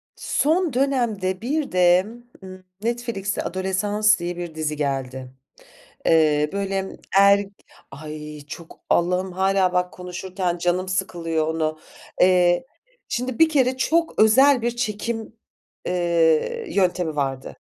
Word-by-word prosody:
Son 320 0 0
dönemde 235 -9 0
bir 285 +5 -2
de, 180 0 +4 0.4
ııı, 185 0 -11 0.2
Netflix'e 235 -4 -2
Adolescence 190 +3 -1
diye 175 0 -4
bir 175 -2 -6
dizi 155 -1 -2
geldi. 130 -3 -3 0.7
Eee, 150 -2 +3
böyle 195 -1 -3 0.2
er 200 +1 +5 0.5
Ay! 150 +1 -8
Çok. 165 +1 -10
Allah'ım 180 +2 +1
hâlâ 190 0 +1
bak 180 0 0
konuşurken 180 0 -4
canım 180 +2 0
sıkılıyor 170 -4 -2
onu. 155 -1 -2 0.4
Eee, 180 +3 +4 0.4
şimdi 250 0 -3
bir 325 -1 +6
kere 260 -4 +2
çok 330 +5 0
özel 255 +4 +5
bir 240 +1 0
çekim, 225 -1 -3 0.5
eee, 175 - +1
yöntemi 180 - 0
vardı. 135 -2 -3
185 Hz, 115 wpm, -22 LUFS, 170-220 Hz, 0.7 s, bir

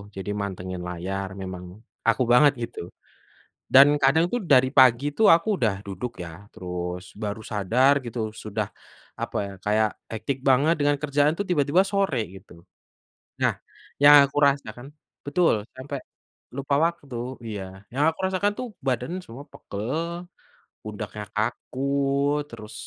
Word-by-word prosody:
jadi 95 +1 -6
mantengin 95 -2 -5
layar. 95 +3 -4
Memang 90 -1 -6 0.5
aku 115 +3 +2
banget 145 +3 +6
gitu 120 - -6 1.0
dan 135 +2 +10 0.2
kadang 155 +5 +4
tuh 245 - 0
dari 130 0 +6
pagi 130 0 +6
tuh 220 - +5
aku 170 +6 0
udah 110 -4 +1
duduk 100 +5 -5
ya, - - -7 0.2
terus 90 0 -5 0.2
baru 105 +1 -3
sadar 115 +7 +3
gitu 120 0 -6 0.3
sudah, 105 -1 -2 0.6
apa - - -4
ya, 100 - -8
kayak 110 +1 +2 0.2
hectic 130 +5 -3
banget 140 +5 +4
dengan 145 0 +3
kerjaan 145 +1 +2
tuh 200 - -1
tiba-tiba 150 +2 +3
sore 195 - +1 0.2
gitu. 95 +1 -14 0.9
Nah - - +3 0.5
yang 145 +1 +9
aku 140 - -9
rasakan 135 -3 -3 0.4
betul 170 +4 +3 0.2
sampai 140 +2 -6 0.6
lupa 140 +1 0
waktu 165 -6 -4 0.3
iya, 105 -3 -5 0.3
yang 140 +3 +1
aku 160 - -7
rasakan 190 +2 +1
tuh 255 - -3 0.2
badan 125 +2 -1
semua 130 +6 -10
pegal, 165 - -5 0.6
pundaknya 105 -1 -6
kaku, 115 +4 -3 0.7
terus 110 -2 -10
125 Hz, 135 wpm, -25 LUFS, 105-145 Hz, 1.0 s, dan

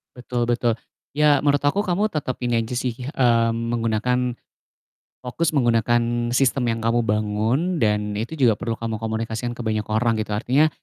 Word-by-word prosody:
Betul 120 -1 -3
betul. 120 -1 +1 0.4
Ya, 150 -2 +4
Menurut 145 -1 +3
aku, 195 +9 +2
kamu 200 +2 +1
tetep 140 -6 -2
ini 120 -1 +1
aja 120 +3 -5
sih, 125 -1 -2 0.2
mmm, 115 -2 +3 0.2
menggunakan 120 +2 0 0.9
fokus 155 +5 -1
menggunakan 120 0 +1
sistem 130 -2 +2
yang 115 0 -1
kamu 115 +1 +2
bangun 110 - 0
dan 105 -1 +1
itu 115 +10 -4
juga 120 -7 +3
perlu 115 -1 -2
kamu 110 -2 -4
komunikasikan 110 +1 -3
ke - - -10
banyak 110 -1 -1
orang, 115 +1 +1
gitu. 105 -1 -4
Artinya, 135 +8 +3
120 Hz, 160 wpm, -22 LUFS, 110-130 Hz, 0.9 s, Ya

